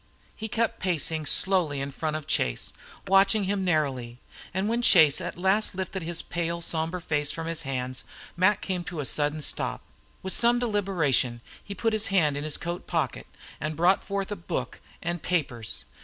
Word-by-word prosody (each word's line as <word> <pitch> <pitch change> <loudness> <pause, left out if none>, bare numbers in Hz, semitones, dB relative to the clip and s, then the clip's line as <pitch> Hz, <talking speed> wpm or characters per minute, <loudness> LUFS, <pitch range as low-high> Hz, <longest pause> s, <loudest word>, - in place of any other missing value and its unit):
He 220 - -5
kept 230 0 -1
pacing 160 -4 0
slowly 160 -8 +2
before 155 +3 -3
Chase, 60 - -1 0.3
watching 195 +2 +5
him 195 0 -1
narrowly; 135 -9 0 0.3
and 190 +3 -1
when 235 +2 +1
Chase 160 -10 +6
at - - -5
last 190 +3 +2
lifted 190 0 -3
his 170 0 -2
pale, 170 0 -2
sombre 165 +1 -1
face 150 -3 -1
from 165 - -4
his 165 0 -1
hands, 130 -2 -3 0.3
Mac 185 +3 +3
came 185 -2 -2
to 170 - -5
a 145 - -2
sudden 150 +2 0
stop. - - -2 0.4
With 190 - +1
some 240 +1 +5
deliberation 180 - +1 0.2
he 200 - -7
put 225 +3 0
his 215 0 +2
hand 160 -7 +3
into 145 +1 -3
his 150 - +1
coat 175 +1 -5
pocket - - -1 0.3
and 155 +1 -3
brought 175 +5 +3
forth 200 0 -3
a - - -1
book 170 - -4 0.2
and 175 -1 -2
papers. 135 -11 -2
170 Hz, 170 wpm, -27 LUFS, 150-195 Hz, 0.4 s, Chase